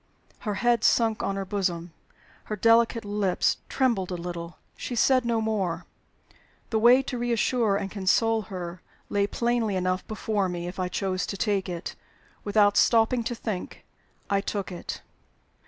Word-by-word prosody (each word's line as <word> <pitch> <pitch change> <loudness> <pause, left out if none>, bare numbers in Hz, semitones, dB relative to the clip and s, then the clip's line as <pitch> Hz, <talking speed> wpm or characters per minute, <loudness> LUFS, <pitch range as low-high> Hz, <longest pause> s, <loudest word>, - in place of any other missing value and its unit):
Her 210 -3 -3
head 240 +1 +2
sunk 225 -2 +3
on 195 - -1
her 195 0 -3
bosom; 180 -4 -2 0.5
her 215 - -3
delicate 230 +1 +3
lips 205 -3 +1
trembled 235 -9 +1
a 180 - -3
little; 170 0 -6 0.2
she 245 - -5
said 255 +1 +3
no 235 -1 +1
more. 190 -6 -1 0.9
The 220 - +2
way 245 +4 +6
to 250 -2 -4
reassure 235 -3 +1
and 195 -1 -4
console 220 +3 +2
her 180 -2 -6 0.3
lay 200 0 +1
plainly 235 -2 0
enough 185 0 -1
before 210 -3 -1
me, 175 -1 -4
if 180 +2 -7
I 185 - 0
chose 185 0 -2
to 200 - -4
take 195 -2 0
it. 175 0 -5 0.5
Without 205 0 +3
stopping 230 +1 +4
to 240 - -2
think, 215 -5 -5 0.4
I 200 0 +1
took 200 -1 -3
it. 175 - -6
205 Hz, 155 wpm, -26 LUFS, 185-230 Hz, 0.9 s, way